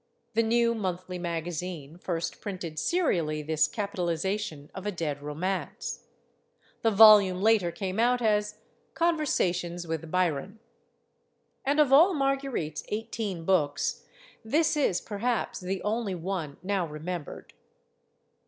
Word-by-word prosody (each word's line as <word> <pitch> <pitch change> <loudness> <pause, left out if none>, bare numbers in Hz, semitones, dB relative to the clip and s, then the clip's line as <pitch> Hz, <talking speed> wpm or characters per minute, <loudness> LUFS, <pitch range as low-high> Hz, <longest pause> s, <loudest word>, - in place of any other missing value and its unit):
The 225 - +3
New 235 +1 +2
Monthly 185 -4 -4
Magazine 170 -2 -4
first 170 -2 -3
printed 180 -6 -5
serially 165 - 0
this 155 0 +2
capitalization 190 -4 -3
of 190 +2 -6
a - - 0
dead 155 -6 -3
romance. 160 +7 -4 0.7
The 225 - +3
volume 205 -3 +7
later 215 -6 +4
came 190 +2 -4
out 245 +2 +3
as 210 -2 +1 0.4
"Conversations 180 - 0
With 165 -1 -4
Byron." 180 +2 0 1.1
And, 285 +2 +1
of 285 -3 +4
all 335 +6 +7
Marguerite's 270 - -1
eighteen 210 -5 -4
books, 150 -7 +1 0.4
this 305 +8 +2
is, 270 -12 +1
perhaps, 225 +3 -2
the 190 0 -4
only 210 -2 -1
one 170 -4 -4
now 190 -2 0
remembered. 155 +1 -6
190 Hz, 115 wpm, -28 LUFS, 170-225 Hz, 1.1 s, volume